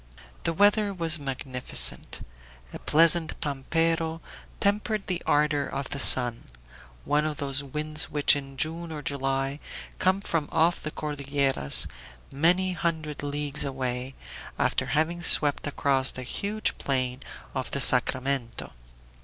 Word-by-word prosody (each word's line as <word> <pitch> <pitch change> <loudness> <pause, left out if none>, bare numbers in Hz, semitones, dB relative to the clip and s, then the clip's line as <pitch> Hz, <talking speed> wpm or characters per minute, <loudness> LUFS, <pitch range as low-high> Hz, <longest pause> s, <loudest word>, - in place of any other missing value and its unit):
The 165 - +1
weather 205 +2 +3
was 165 -2 +2
magnificent. 130 -2 -2 0.5
A - - -7
pleasant 165 +1 +3
"pampero" 165 +3 -1 0.4
tempered 210 +1 0
the 180 -2 -3
ardor 145 -1 +2
of 140 -1 -5
the 140 - -4
sun 120 -3 +6 0.6
one 150 +1 +1
of 155 -1 -3
those 140 -1 -1
winds 150 +2 0
which 145 -1 +3
in 135 -1 -7
June 165 +4 -1
or 150 -2 -6
July 135 0 -2 0.4
come 185 +1 +2
from 165 -6 -2
off 165 +2 +2
the 155 - -4
Cordilleras, 140 - +1 0.5
many 180 +6 +2
hundred 160 -4 -3
leagues 145 +1 -2
away, 130 -1 -4 0.4
after - - 0
having 165 +3 0
swept 145 -3 +4
across 135 -2 +1
the 130 - -4
huge 205 - -2
plain 130 -2 -1 0.3
of 130 - -4
the 140 - -3
Sacramento. 130 -1 +1
145 Hz, 130 wpm, -26 LUFS, 135-165 Hz, 0.6 s, sun